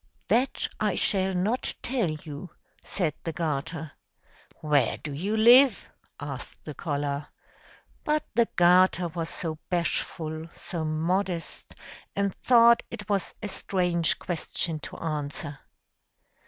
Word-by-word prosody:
"That 255 +3 +2
I 210 -4 +1
shall 190 -1 +2
not 210 +8 0
tell 240 -8 0
you!" 155 +2 -7 0.3
said 170 -6 -1
the 165 - -2
garter. 160 0 -3 0.7
"Where 145 -6 +2
do 150 - -6
you 195 +10 -1
live?" 240 +1 +7 0.3
asked 140 -3 -7
the 150 - -5
collar. 145 -1 -2 0.8
But 300 0 +1
the 235 0 +3
garter 180 0 +5
was 165 0 -4
so 160 -3 -4
bashful, 160 -2 -1
so 170 -3 -5
modest, 170 +3 -2 0.4
and 200 -1 0
thought 235 -1 +6
it - - -8
was 200 -2 -1
a - - -1
strange 180 -4 0
question 165 -2 -3
to - - -9
answer. 145 -2 -4
170 Hz, 120 wpm, -27 LUFS, 155-200 Hz, 0.8 s, live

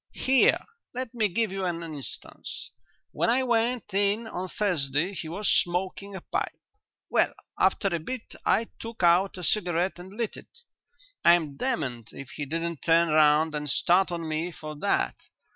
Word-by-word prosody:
Here, 265 -1 +3 0.3
let 255 -1 -4
me 225 -3 +2
give 215 +2 0
you 195 0 -3
an 170 -2 -2
instance. 150 -5 -8 0.4
When - - +1
I 255 +3 +3
went 235 -3 0
in 205 +3 +2
on 185 -4 -4
Thursday 170 -3 0
he 165 -4 -5
was 195 +5 -2
smoking 190 +3 +1
a 190 - -6
pipe. 390 - -3 0.5
Well, - - +2 0.2
after 200 - +3
a 170 -2 -1
bit 240 +9 -6
I 230 - +2
took 230 -4 -6
out 180 +3 +4
a 180 - -7
cigarette 175 -1 +1
and 185 +2 -10
lit 235 -2 -2
it. 475 - -15 0.6
I'm 165 -5 +4
damned 130 - -2
if 135 -2 -9
he 150 - -5
didn't 165 +2 -3
turn 165 0 +4
round 155 +1 +4
and 150 -1 -3
start 180 +6 +3
on 170 -2 -3
me 160 +3 -2
for 155 -2 -8
that. - - 0
180 Hz, 165 wpm, -27 LUFS, 160-215 Hz, 0.6 s, out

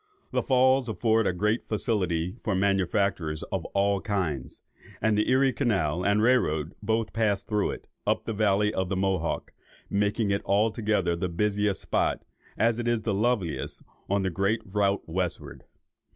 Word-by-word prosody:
The - - +1
falls 130 -1 +3
afford 110 +1 +2
great 105 +4 0
facilities 95 -4 -1
for 105 - 0
manufactures 95 -4 0
of 95 -3 -2
all 100 0 +1
kinds, 90 - -3 0.4
and 110 0 +2
the 105 - +1
Erie 130 +1 +3
canal 90 - 0
and 100 +2 +2
rail 125 +1 +5
road 75 +2 -2
both 110 +1 -1
pass 105 -4 +1
through 105 -2 0
it, - - -7 0.2
up - - +1
the 115 - -2
Valley 105 0 +2
of 95 -2 -1
the 95 - -1
Mohawk, 95 0 -1 0.4
making 105 +1 +1
it 100 - 0
altogether 105 -3 +1
the 90 +1 -2
busiest 105 +3 0
spot, - - -1 0.3
as 115 +1 +2
it 120 - -2
is 120 -2 +1
the 110 -1 -1
loveliest 105 -5 -1 0.3
on 100 0 +1
the 95 - 0
great 100 +6 0
route 100 0 0
westward. 90 +1 -4
100 Hz, 160 wpm, -27 LUFS, 95-110 Hz, 0.4 s, rail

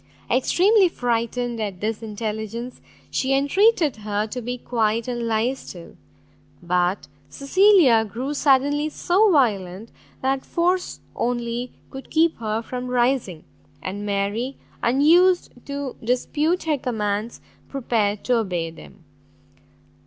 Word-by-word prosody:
Extremely 375 - +4
frightened 240 -2 -2
at 200 -4 -4
this 215 +2 -2
intelligence, 220 +2 -5 0.3
she 270 +1 +1
entreated 315 - +3
her 210 0 -2
to 250 +3 -6
be 245 +2 -4
quiet 230 -1 -1
and 240 -2 -3
lie 225 +3 +1
still. 175 -9 -11 0.7
But 180 +2 0 0.2
Cecilia 285 - +4
grew 245 +7 -4
suddenly 290 +1 +2
so 375 +7 +2
violent, 210 - 0 0.3
that 265 0 0
force 360 +2 -1
only 240 0 -2 0.2
could 265 0 -9
keep 325 +1 +2
her 220 0 -2
from 250 +2 -5
rising; 245 -8 0 0.4
and 200 +5 -5
Mary, 205 +6 -2 0.2
unused 335 +9 +4 0.2
to 280 -2 -4
dispute 295 +8 0
her 305 -3 0
commands, 215 -2 -2 0.3
prepared 220 -6 -1
to 250 -1 +2
obey 175 -7 -2
them. 165 +2 -15
245 Hz, 115 wpm, -23 LUFS, 215-280 Hz, 0.7 s, Extremely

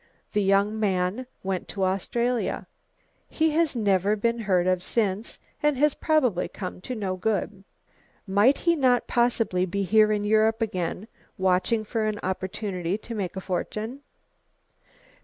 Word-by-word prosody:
The 210 - +1
young 200 +2 +2
man 195 +4 0 0.2
went 190 -1 -2
to 195 - -3
Australia. 235 +6 -1 0.6
He 320 0 +1
has 320 -2 +1
never 200 -2 +2
been 235 +2 0
heard 185 -5 +1
of 185 -1 +1
since 210 +1 -1 0.2
and 295 -3 +2
has 295 +1 +3
probably 255 - +1
come 185 -2 -7
to 255 - -5
no 195 -4 -2
good." 200 0 -2 0.6
"Might 205 +7 +4
he 340 -1 +2
not 255 -5 +3
possibly 235 -6 +1
be 200 +3 -1
here 215 +2 +4
in 210 -1 0
Europe 220 +1 +3
again, 190 -2 -2 0.3
watching 190 +4 +2
for 220 +1 -2
an 210 -1 -2
opportunity 185 0 -2
to 230 +2 -8
make 195 -5 -3
a 190 - -4
fortune?" 215 +7 -4
210 Hz, 145 wpm, -26 LUFS, 190-235 Hz, 0.6 s, Might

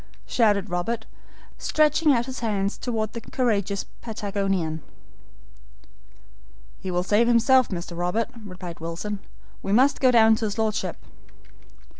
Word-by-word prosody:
shouted 205 -4 +2
Robert, 220 +6 -2 0.5
stretching 305 0 +3
out 240 -3 +2
his 260 -1 -6
hands 205 -3 -1
toward 220 -3 -3
the 230 - -5
courageous 205 -6 -1 0.2
Patagonian. 195 -7 -2 2.0
"He 190 - -5
will 180 0 0
save 210 +5 +3
himself, 240 +2 +4
Mr. 175 -2 -5
Robert," 180 +7 -1
replied 180 -3 -8
Wilson; 170 +5 -4 0.4
"we 195 - -3
must 260 +7 +4
go 260 - +6
down 225 -2 +6
to 220 - -2
his 210 +1 -3
Lordship." 220 -1 -1
215 Hz, 125 wpm, -25 LUFS, 190-235 Hz, 2.0 s, go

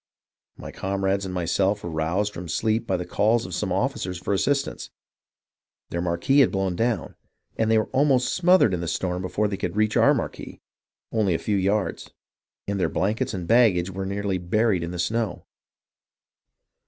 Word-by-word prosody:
My - - -8
comrades 95 0 -1
and 95 - -5
myself 95 +4 0
were 85 - -4
roused 85 +7 -1
from 85 +1 -7
sleep 110 +5 0
by 95 - +1
the 90 - -4
calls 110 +4 +1
of 90 - -7
some 95 +1 -2
officers 95 -3 -1
for 90 +3 -2
assistance; 140 +8 -1 1.0
their 85 - -2
marquee 90 +11 +2
had 135 - +5
blown 95 -2 -1
down, 115 +2 -1 0.4
and 110 -1 0
they 110 - +4
were 110 - +2
almost 135 -2 +2
smothered 180 - +4
in 85 - -1
the 85 - -4
storm 90 +2 -2
before 105 +3 -1
they 100 -1 -3
could - - -3
reach 110 0 +1
our - - +5
marquee, - - -5 0.5
only 105 -6 +1
a - - +1
few 105 - -1
yards; 100 +1 -1 0.6
and 100 -1 -2
their - - +1
blankets 105 +2 -1
and 90 -2 -4
baggage 105 -7 +4
were 95 0 -4
nearly 100 -1 -2
buried 100 +2 +1
in 85 - -4
the 90 - -6
snow. 110 +6 -2
100 Hz, 180 wpm, -24 LUFS, 90-110 Hz, 1.0 s, had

